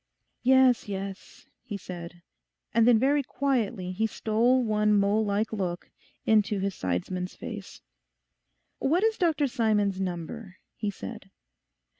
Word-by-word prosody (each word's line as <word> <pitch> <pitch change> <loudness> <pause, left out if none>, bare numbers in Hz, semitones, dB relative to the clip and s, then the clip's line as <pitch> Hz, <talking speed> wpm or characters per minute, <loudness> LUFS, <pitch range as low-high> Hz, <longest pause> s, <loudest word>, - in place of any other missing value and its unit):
'Yes, 260 -2 +4
yes,' 195 -1 -7 0.2
he 205 - -6
said. 175 -2 -9 0.5
And 230 0 +4
then 240 -2 +7
very 280 +5 +3
quietly 240 -9 -1
he 220 +4 0
stole 235 +4 +2
one 210 -1 +2
mole 200 +2 +3
like 210 +2 -1
look 180 -4 -3 0.3
into 215 -1 +3
his 195 0 -1
sidesman's 180 - -3
face. - - -8 1.0
'What 335 +8 +2
is 445 0 +1
Dr 320 -5 +2
Simon's 210 -6 +1
number?' 185 +3 -5 0.2
he 210 - -2
said. 205 0 -8
210 Hz, 125 wpm, -27 LUFS, 190-245 Hz, 1.0 s, then